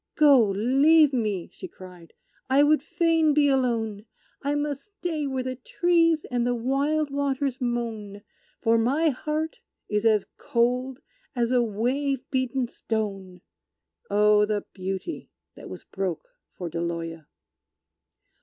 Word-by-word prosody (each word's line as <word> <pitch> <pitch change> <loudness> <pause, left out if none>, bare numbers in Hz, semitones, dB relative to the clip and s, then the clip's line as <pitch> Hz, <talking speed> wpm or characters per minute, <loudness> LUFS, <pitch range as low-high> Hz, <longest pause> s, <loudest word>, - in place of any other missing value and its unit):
"Go 280 -7 +6
leave 275 +9 +4
me!" 210 -8 -1
she - - -8
cried. 180 -3 -14 0.4
"I 275 +2 +5
would 300 0 +4
fain 325 -1 +2
be 295 -1 +4
alone; 230 -5 0 0.3
I 285 +1 -1
must 290 0 -3
stay 350 -8 -4
where 260 -1 -2
the 255 0 -4
trees 330 +3 +2
and 245 -1 +1
the 245 0 +1
wild 280 +5 0
waters 275 -2 -1
moan; 225 -4 -3 0.4
For 225 0 +3
my 285 +8 +2
heart 305 +3 -3 0.3
is 210 0 -1
as 215 -3 +3
cold 250 +3 0 0.3
as 240 -1 0
a 250 -1 +4
wave 250 +5 -1
beaten 260 -1 0
stone." 195 -6 -4 0.7
Oh, 210 0 +4
the 210 -1 -2
Beauty 190 - -5 0.2
that - - -11
was - - -9
broke 190 - -4 0.3
for 180 - -4
Deloya! 165 -1 -4
250 Hz, 130 wpm, -25 LUFS, 210-290 Hz, 0.7 s, Go